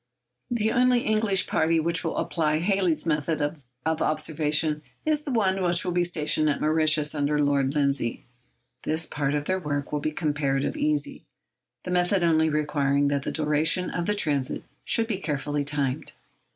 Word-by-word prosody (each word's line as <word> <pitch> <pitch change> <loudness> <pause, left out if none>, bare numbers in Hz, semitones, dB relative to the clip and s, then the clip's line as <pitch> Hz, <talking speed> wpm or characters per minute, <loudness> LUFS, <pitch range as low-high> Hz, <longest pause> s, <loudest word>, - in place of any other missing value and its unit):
The 220 -2 0
only 250 0 +3
English 215 -4 +1
party 160 +1 +1
which 170 +2 0
will - - -3
apply 155 -2 0
Halley's 180 -2 0
method 155 -1 0
of 145 +1 -3
observation 155 0 0 0.2
is 305 -1 +1
the 295 - -5
one 195 -5 +1
which 175 0 +2
will 180 - -1
be 175 0 +2
stationed 155 -3 +1
at 145 - -1
Mauritius, 155 -1 +2
under 150 0 0
Lord 140 -1 +1
Lindsay. 140 -5 -1 0.6
This 160 +1 0
part 145 0 -2
of 145 0 -2
their 185 +2 0
work 145 -4 -3
will 150 - -1
be 155 - -1
comparatively 145 - -1
easy, 300 0 +1 0.6
the 180 - -5
method 180 +1 +2
only 160 -1 +3
requiring 145 -2 +1
that 140 -1 0
the - - -4
duration 155 +4 +1
of 175 -1 -3
the 210 - +1
transit 145 -9 -1 0.2
should 230 - +1
be 215 -4 -3
carefully 145 -3 -2
timed. 140 -1 -2
155 Hz, 165 wpm, -25 LUFS, 145-180 Hz, 0.6 s, only